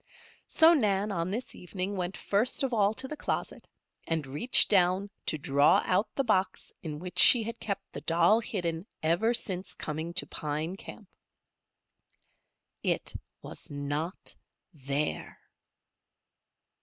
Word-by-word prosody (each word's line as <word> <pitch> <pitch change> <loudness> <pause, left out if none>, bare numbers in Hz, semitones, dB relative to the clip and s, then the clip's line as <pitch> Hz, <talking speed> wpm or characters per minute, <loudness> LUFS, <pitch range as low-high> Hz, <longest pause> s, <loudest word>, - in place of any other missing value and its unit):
So 325 +1 +6
Nan, 210 - +1
on 170 -2 -2
this 230 +6 -3
evening, 185 +2 -5
went 180 0 -3
first 225 +8 0
of 260 -2 -1
all 205 -2 +3
to 260 +2 -2
the 305 - -6
closet - - -4 0.4
and 160 -3 -1
reached 145 - +4
down 190 +1 +3 0.2
to 155 - 0
draw 140 -1 +3
out 190 +4 +1
the 275 - +1
box 190 -5 -1
in 155 -3 -6
which 180 +3 -5
she 240 -3 +8
had 230 +1 -6
kept 200 -2 -3
the - - -6
doll 175 +7 +3
hidden 175 -5 -3 0.2
ever 175 +9 +2
since 190 -5 -3
coming 160 +2 -4
to 185 - +1
Pine 155 +4 -4
Camp. 200 +1 -11 1.7
It - - -1 0.3
was - - -8
not 145 +5 -4 0.4
there! 140 0 -3
185 Hz, 135 wpm, -29 LUFS, 160-215 Hz, 1.7 s, she